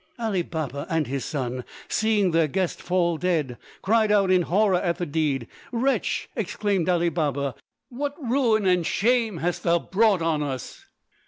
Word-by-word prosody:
Ali 220 -6 0
Baba 150 -5 -4
and 160 -2 +1
his 135 +1 -3
son, 130 -4 -3 0.2
seeing 215 -4 +2
their 165 -1 +3
guest 185 +3 -2
fall 175 -2 +1
dead, 155 -9 -1 0.2
cried 220 +1 +3
out 200 -2 +3
in 185 -1 +5
horror 190 +1 +2
at 170 -2 0
the 175 - -2
deed. 145 -6 -1 0.2
"Wretch!" 260 +3 0
exclaimed 195 -4 -1
Ali 175 -1 +2
Baba, 145 -4 -1 0.4
"what 285 +3 -4
ruin 235 -5 +1
and 180 -2 +3
shame 225 +1 +1
hast 175 +2 -2
thou 170 0 +3
brought 195 0 +2
on 160 -2 +1
us?" 135 -4 -5
175 Hz, 160 wpm, -25 LUFS, 155-210 Hz, 0.4 s, in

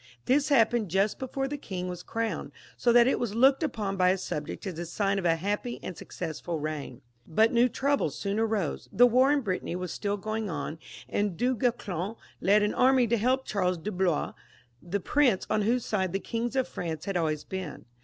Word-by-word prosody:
This 280 +4 +3
happened 235 -6 +3
just 195 +4 +1
before 270 +1 -2
the 290 +1 -5
king 185 -7 -5
was 180 -1 -5
crowned, 230 -1 -3 0.2
so 240 - +2
that 240 0 +7
it 265 - +2
was 225 -4 -2
looked 265 +5 +5
upon 210 -10 -2
by 180 -1 +4
his 190 0 0
subjects 150 +7 -5
as 180 -4 -5
a 175 - -4
sign 200 +3 0
of 185 - -5
a 165 -1 +4
happy 205 +7 -2
and 185 - -5
successful 160 +1 -5
reign. 150 -5 -5 0.2
But 220 +7 +3
new 240 +1 +4
troubles 260 - 0
soon 200 +6 -2
arose; 220 -7 -1
the 245 - +6
war 255 +3 +4
in 290 -1 +3
Brittany 185 -5 -2
was 180 -1 -4
still 205 0 -2
going 215 +1 -3
on, 155 0 -4 0.3
and 205 -4 -1
Du 255 +1 +1
Guesclin 215 -4 -1 0.3
led 205 +2 +4
an 210 - +1
army 260 -1 +4
to 235 - +3
help 255 +4 +1
Charles 185 -3 0
de 195 +6 -4
Blois,'the 175 - -3
prince 255 -8 +2
on 215 0 +2
whose 235 +4 +1
side 190 -4 -1
the 195 - 0
kings 235 +4 -3
of 260 -1 +1
France 160 -3 -5
had 195 -2 -3
always 155 -3 0
been. 185 -5 -6
205 Hz, 205 wpm, -28 LUFS, 180-240 Hz, 0.3 s, that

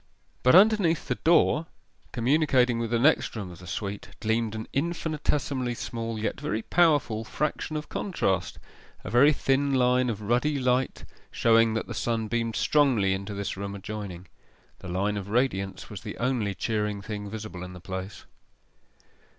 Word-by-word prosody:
But 130 - +5
underneath 195 -4 +5
the - - +1
door, 165 -1 +3 0.4
communicating 125 -1 +2
with 115 -1 -2
the 120 - +1
next 140 +2 +3
room 100 -5 -5
of 85 - -12
the 90 - -12
suite, 100 +2 -5
gleamed 110 0 0
an 110 - -5
infinitesimally 145 -5 -1
small, 115 -1 -4
yet 110 +5 -2
very 110 -7 -2
powerful, 145 -10 +2
fraction 150 +5 -3
of 150 - -6
contrast 95 - -1 0.5
a - - -6
very 130 +6 +6
thin 140 -1 +1
line 125 0 +3
of 105 -2 -4
ruddy 125 +7 +1
light, 125 0 0 0.2
showing 115 -1 +3
that 110 - -1
the - - -6
sun 115 -2 -1
beamed 115 -1 -1
strongly 125 -10 +3
into 100 +2 -5
this 100 0 -3
room 100 +1 -5
adjoining. 100 -3 -7 0.5
The - - -9
line 100 +4 -1
of 100 0 -6
radiance 105 -5 -1
was 100 -1 -7
the 105 -2 -7
only 115 -5 -1
cheering 105 -2 -2
thing 105 0 -5
visible 105 -4 -7
in 90 0 -8
the 90 - -10
place. 95 +2 -7
115 Hz, 160 wpm, -27 LUFS, 100-135 Hz, 0.5 s, very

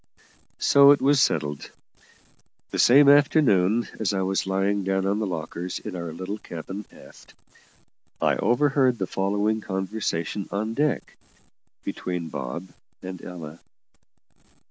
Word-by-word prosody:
So 140 0 +6
it 145 - +6
was 140 0 +3
settled. 75 - -1 1.0
That - - -3
same 140 +4 +6
afternoon, 120 - +4
as 105 -2 0
I 95 - 0
was 95 0 -1
lying 95 +1 0
down 95 0 0
on 100 +2 0
the 110 - -1
lockers 85 +1 -5
in 105 -3 -7
our 85 -2 -5
little 95 +6 -6
cabin 95 +4 -8
aft, - - -17 0.8
I - - +2
overheard 130 +2 +2
the 95 - -2
following 105 +4 -1
conversation 95 -2 -3
on 110 +3 -2
deck, 145 +3 -1 0.7
between 90 -3 -4
Bob 85 +9 -6 0.3
and 90 -1 -7
Ella. 85 -3 -9
95 Hz, 125 wpm, -25 LUFS, 90-115 Hz, 1.0 s, So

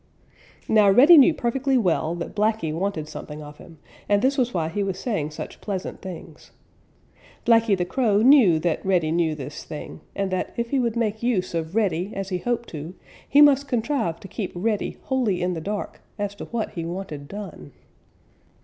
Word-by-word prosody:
Now 210 -2 +5
Reddy 270 - +8
knew 290 +2 +8
perfectly 265 +1 0
well 170 -6 +1
that 170 - -6
Blacky 215 -6 0
wanted 170 -2 -2
something 150 0 -8
of 150 0 -12
him, 165 - -14 0.3
and 205 0 +3
this 270 +2 +3
was 250 -3 +1
why 165 -6 -1
he 205 +5 -2
was 195 -2 -2
saying 190 - -2
such 150 - -8
pleasant 195 -3 -5
things. 185 -3 -10 1.0
Blacky 225 -3 +4
the 180 - -1
Crow 215 0 +1
knew 245 - +6
that 170 -1 -1
Reddy 180 -5 +1
knew 165 -2 +1
this 145 +1 -7
thing, 155 0 -8
and 195 -1 -2
that 185 -1 -3
if 235 0 -2
he 275 - +2
would 235 -2 0
make 220 -2 -1
use 220 -8 0
of 165 +2 -3
Reddy 195 -3 0
as 195 -1 -4
he 180 -2 -2
hoped 235 +3 -2
to, 160 +3 -7 0.3
he 290 - +6
must 280 -1 +5
contrive 230 - -1
to - - -9
keep 195 -1 -5
Reddy 210 +3 -1
wholly 245 -9 0
in 180 +1 -1
the 165 - -5
dark 205 +4 -5 0.2
as 205 -1 -3
to 205 - -8
what 235 -2 -3
he 170 - -5
wanted 165 -4 -6
done. 195 - -9
195 Hz, 190 wpm, -24 LUFS, 170-235 Hz, 1.0 s, Reddy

